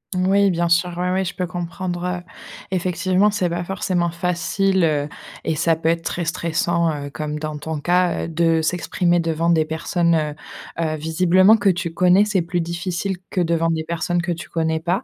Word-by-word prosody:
Oui, 195 +2 +3
bien 170 0 0
sûr, 170 +1 +2
ouais, 180 +1 0
ouais, 190 +1 0
je 170 - -4
peux 180 -1 -2
comprendre, 175 0 -4
heu, 180 0 -2 0.5
effectivement, 185 +2 +1
c'est 200 -4 0
pas 175 +1 -3
forcément 180 -2 -1
facile, 180 +2 0
heu, 150 -2 0 0.3
et 160 - -1
ça 165 0 +2
peut 160 0 -1
être 165 0 0
très 175 - -2
stressant, 170 0 0 0.2
heu, - - -7
comme 150 +1 -4
dans 155 -1 -4
ton 150 0 -5
cas, 180 +1 +1
heu, - - -3
de 165 0 +2
s'exprimer 175 +1 +1
devant 165 0 0
des 160 -2 +3
personnes, 170 +2 0
heu 155 -2 -1 0.5
heu, 155 -1 0
visiblement 180 +6 +4
que 205 - -1
tu 170 -3 +1
connais, 180 +3 +5
c'est 210 -3 +1
plus 175 +1 -2
difficile 175 +3 -3
que 185 - 0
devant 165 -1 +1
des 160 -1 -1
personnes 170 +2 -1
que 175 0 -2
tu 170 0 -5
connais 160 -1 0
pas. 180 +8 -1
170 Hz, 195 wpm, -21 LUFS, 165-180 Hz, 0.5 s, connais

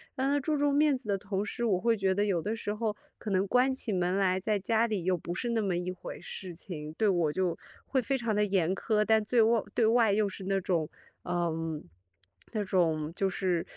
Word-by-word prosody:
让 265 +1 0
他 285 +1 +2
注 300 +2 0
重 285 0 +2
面 295 -1 +4
子 250 -3 -13
的 200 - +2
同 195 +1 -3
时， 235 +3 -4
我 200 -6 +2
会 230 +3 +2
觉 195 -3 +1
得 205 +2 +1
有 185 -5 +1
的 215 +6 -2
时 210 -2 -3
候， 215 -1 -2 0.2
可 215 - -6
能 190 +1 +2
关 250 +5 +3
起 235 -5 -1
门 180 +1 +1
来 185 -1 +2
在 210 +2 0
家 225 +3 +2
里， 210 -5 -2
又 185 - +3
不 170 +1 -5
是 240 +5 -2
那 230 -1 +1
么 190 -3 0
一 180 +1 -2
回 185 - -8
事 185 -3 -7
情， 160 -3 -7
对 215 +5 +1
我 175 -6 +2
就 180 -2 0 0.3
会 265 - +1
非 270 +2 0
常 230 -3 -1
地 210 - +3
严 190 -3 +1
苛， 210 +1 +1
但 220 -1 +4
最 235 +3 +1
外 230 0 +3
对 230 - +3
外 225 -1 +4
又 210 0 +2
是 195 -1 -7
那 195 0 +1
种， 170 -4 -1 0.4
嗯， 165 -3 -2 0.7
那 215 -2 0
种 165 -4 +1
就 195 0 +1
是 180 -2 0
200 Hz, 255 characters per minute, -30 LUFS, 180-225 Hz, 0.7 s, 面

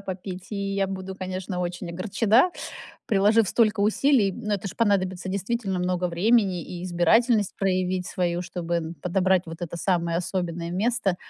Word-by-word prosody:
попить, 185 -1 -7
и 200 -1 -2
я 195 -1 +1
буду, 190 0 -5
конечно, 185 -1 -4
очень 175 0 -4
огорчена, 215 - +3 0.6
приложив 210 +1 +4
столько 215 -3 +2
усилий. 215 -1 +3
Но 215 -2 -2
это 200 0 -4
ж - - -6
понадобится 190 -4 +1
действительно 195 0 -2
много 180 0 0
времени 190 0 +2
и 175 +2 -7
избирательность 205 +5 +3
проявить 185 -1 0
свою, 175 -2 -1
чтобы, 175 -1 -4
м, 165 0 -4
подобрать 185 0 +2
вот 165 0 -8
это 170 0 -5
самое 170 -2 0
особенное 170 -1 -3
место 200 -1 0
185 Hz, 155 wpm, -25 LUFS, 180-205 Hz, 0.6 s, приложив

